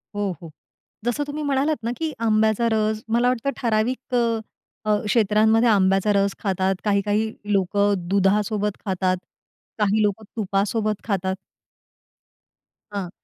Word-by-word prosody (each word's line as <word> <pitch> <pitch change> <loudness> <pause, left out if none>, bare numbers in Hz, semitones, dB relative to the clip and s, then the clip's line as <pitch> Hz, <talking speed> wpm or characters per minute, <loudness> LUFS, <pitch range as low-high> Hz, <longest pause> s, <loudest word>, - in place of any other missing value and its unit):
हो, 205 -2 -1
हो. 165 - -9 0.6
जसं 245 +5 0
तुम्ही 300 +1 -4
म्हणालात 280 -2 0
ना 235 - -1
की 320 -1 -2
आंब्याचा 220 +1 +2
रस, 215 0 0
मला 240 +2 +2
वाटतं 250 +2 0
ठराविक 240 +2 -1
अ, 230 -2 +2 0.5
अ, 210 0 +3
क्षेत्रांमध्ये 220 +1 +3
आंब्याचा 195 0 +3
रस 200 0 +1
खातात, 190 -1 +1
काही-काही 210 +1 +1 0.2
लोकं 200 +2 +2 0.2
दुधासोबत 205 +1 +1
खातात, 185 -1 0 0.6
काही 210 +1 +2
लोकं 210 +1 0
तुपासोबत 210 +1 0
खातात. 190 -3 -1 1.6
हां. 190 -4 -3
215 Hz, 120 wpm, -23 LUFS, 200-230 Hz, 1.6 s, अ